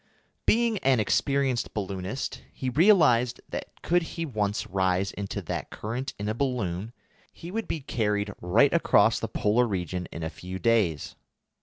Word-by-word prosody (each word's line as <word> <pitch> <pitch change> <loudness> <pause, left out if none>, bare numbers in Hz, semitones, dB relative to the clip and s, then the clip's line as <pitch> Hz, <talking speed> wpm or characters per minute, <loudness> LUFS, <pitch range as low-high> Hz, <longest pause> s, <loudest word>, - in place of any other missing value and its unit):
Being 230 -2 +3
an 130 -5 +3
experienced 135 +3 +1
balloonist, 100 +3 -4
he 130 -1 -3
realised 125 - +4
that, - - -7
could 175 +1 +3
he 165 0 -4
once 105 -5 -1
rise 95 -1 0
into 100 -1 -5
that - - -4
current 125 +6 -5
in 105 - -4
a 110 - 0
balloon, 115 -6 -2 0.4
he 170 - -9
would 225 +2 -3
be 160 - -3
carried 105 -5 -1
right 115 +11 +4
across 115 -9 +4
the 115 - -3
Polar 110 +2 +2
region 90 -3 -3
in 85 - -6
a 80 - -3
few 90 +1 -7
days. 100 - +1
110 Hz, 155 wpm, -27 LUFS, 100-135 Hz, 0.4 s, realised